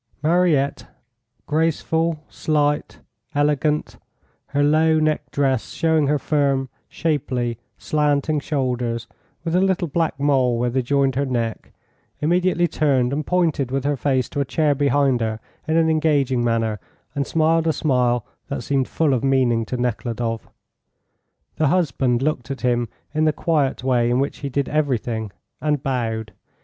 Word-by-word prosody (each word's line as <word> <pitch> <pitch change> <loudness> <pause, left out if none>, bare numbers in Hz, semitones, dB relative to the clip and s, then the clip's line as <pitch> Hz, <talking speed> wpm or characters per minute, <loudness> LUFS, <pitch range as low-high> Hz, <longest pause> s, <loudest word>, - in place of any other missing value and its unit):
Mariette, 160 -4 +2 0.6
graceful, 160 0 0
slight, 150 -1 -1 0.3
elegant, 150 +1 +1 0.5
her 145 +1 0
low 155 +2 +4
necked 155 -1 0
dress 135 -4 0
showing 160 -3 +2
her 150 +1 +2
firm, 140 -2 0 0.2
shapely, 125 -7 -1 0.2
slanting 150 0 +1
shoulders, 125 -5 -2 0.4
with 165 0 -1
a 180 - +4
little 190 -2 +1
black 160 -2 -1
mole 135 -4 +2
where 120 +1 0
they 130 +2 +1
joined 135 +1 +1
her 140 +3 0
neck, 115 -3 -3 0.5
immediately 175 +2 +2
turned, 140 -5 +1
and 150 +1 -3
pointed 165 -7 +1
with 135 0 -1
her 145 0 +1
face 130 -2 0
to - - -4
a - - +3
chair 150 +2 +1
behind 140 -3 +2
her 110 -1 -2 0.3
in 160 +1 +2
an 165 -1 +4
engaging 145 -6 +2
manner, 115 -3 0 0.3
and 140 -2 -2
smiled 165 +1 +2
a - - +4
smile 125 -6 +1 0.2
that 140 -3 -4
seemed 135 0 0
full 155 -4 +1
of 125 - 0
meaning 130 -4 +2
to 125 - -4
Nekhludoff. 115 -1 -2 1.1
The 155 - +2
husband 135 -7 +1
looked 140 -4 -1
at 135 - -5
him 120 -2 +1 0.2
in 155 0 +2
the 155 - +4
quiet 145 -7 0
way 125 -2 +2
in 120 +1 +2
which 140 +1 -2
he 140 - -4
did 140 +1 -1
everything, 120 -8 -1 0.3
and 150 -2 0
bowed. 115 -5 -2
140 Hz, 150 wpm, -22 LUFS, 125-155 Hz, 1.1 s, low